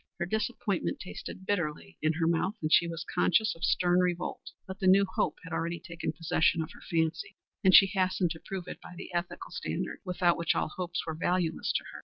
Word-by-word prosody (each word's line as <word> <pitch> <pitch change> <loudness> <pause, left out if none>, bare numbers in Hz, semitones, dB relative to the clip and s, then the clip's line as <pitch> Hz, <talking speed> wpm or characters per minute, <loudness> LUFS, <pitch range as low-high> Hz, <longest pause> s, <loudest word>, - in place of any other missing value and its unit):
Her 175 - -1
disappointment 215 -1 -1
tasted 190 0 -8
bitterly 150 - -2
in 155 +1 +2
her 165 +1 0
mouth, 170 +5 +1
and 155 0 0
she 170 - +6
was 165 0 -5
conscious 220 +5 +3
of 165 - -12
stern 180 0 +3
revolt; 180 -1 -1 0.2
but 190 +1 -8
the 190 - +1
new 195 +2 +6
hope 185 - -1
had 165 - -8
already 170 +1 -2
taken 170 0 -4
possession 165 0 +1
of 160 - -9
her - - -14
fancy, 165 0 -1 0.3
and 190 - +6
she 195 - +10
hastened 185 -2 +1
to 160 - -5
prove 190 0 -6
it - - -8
by 180 - -11
the 180 - -8
ethical 175 +1 -3
standard - - -4
without 180 -2 +2
which 170 - +1
all - - 0
hopes 175 +1 -4
were 160 - -3
valueless 170 0 0
to - - 0
her. - - -8
175 Hz, 215 wpm, -30 LUFS, 165-185 Hz, 0.3 s, she